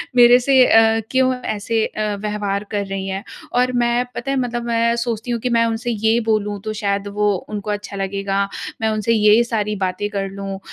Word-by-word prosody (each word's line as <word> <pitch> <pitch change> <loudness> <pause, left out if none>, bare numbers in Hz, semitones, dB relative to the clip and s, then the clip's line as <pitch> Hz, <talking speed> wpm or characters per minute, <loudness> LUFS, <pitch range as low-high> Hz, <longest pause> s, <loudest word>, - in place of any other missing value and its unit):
मेरे 245 0 +7
से 260 0 +5
अ, 225 0 +5
क्यों 260 0 +3
ऐसे 220 +1 -1
अ, 210 -1 -3
व्यवहार 210 -1 -2
कर 205 -1 -1
रही 195 0 -4
है। 195 +1 -4 0.3
और 250 +1 +2
मैं 240 +1 +1
पता 275 - -3
है? 275 - 0
मतलब 240 -2 -2
मैं 235 0 +1
सोचती 235 0 -3
हूँ 235 - -1
कि 250 - -1
मैं 230 -1 +3
उनसे 230 +1 -2
ये 220 +2 +2
बोलूँ 210 -2 0
तो 215 0 -4
शायद 200 -1 -1
वो 210 0 +3 0.2
उनको 210 0 -5
अच्छा 205 -1 -5
लगेगा। 195 0 -1 0.3
मैं 220 - +2
उनसे 215 +1 0
ये 215 +2 +5
सारी 215 -3 -2
बातें 190 +1 -2
कर 195 -2 -3
लूँ। 195 0 -6
215 Hz, 200 wpm, -20 LUFS, 200-235 Hz, 0.3 s, मेरे